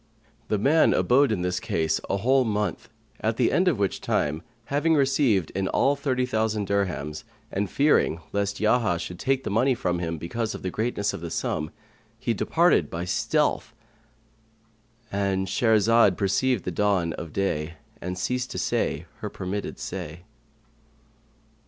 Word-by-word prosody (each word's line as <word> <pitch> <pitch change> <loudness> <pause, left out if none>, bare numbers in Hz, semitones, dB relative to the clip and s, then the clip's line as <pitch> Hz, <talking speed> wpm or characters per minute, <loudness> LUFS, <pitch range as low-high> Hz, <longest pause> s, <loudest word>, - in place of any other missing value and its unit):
The 105 - +1
man 145 +10 +4
abode 135 +1 +4
in 95 -5 -1
this 90 0 -1
case 80 -1 -1
a 100 - +1
whole 130 +6 +3
month, 105 -2 -2 0.3
at 110 +1 -1
the 125 - +3
end 185 - +2
of 165 -9 +3
which 100 -1 -1
time, 75 +2 0 0.3
having 160 +3 +3
received 135 - +2
in 95 0 -1
all 140 +7 +2
thirty 130 -3 0
thousand 110 -3 0
dirhams 90 -7 -2 0.3
and 100 0 -1
fearing 140 - +2
lest 100 0 -1
Yahya 110 -4 +2
should 90 +1 -6
take 135 0 0
the - - -3
money 125 +5 +3
from 90 -6 -1
him, 85 -1 -3
because 110 +8 -3
of - - -9
the 90 - -2
greatness 105 -1 -1
of - - -6
the 85 - -5
sum, 75 -1 -2 0.5
he - - -1
departed - - +2
by 85 +1 -4
stealth.—And 110 +1 -4
Shahrazad 110 0 +3
perceived 100 +4 +1
the 90 - -2
dawn 95 -3 +1
of 85 0 -7
day 85 -4 -2 0.3
and 90 +1 -4
ceased 125 +6 -2
to - - -6
say - - -1
her - - -4
permitted 95 +2 -5
say. 85 -3 -6
105 Hz, 155 wpm, -25 LUFS, 90-120 Hz, 0.5 s, man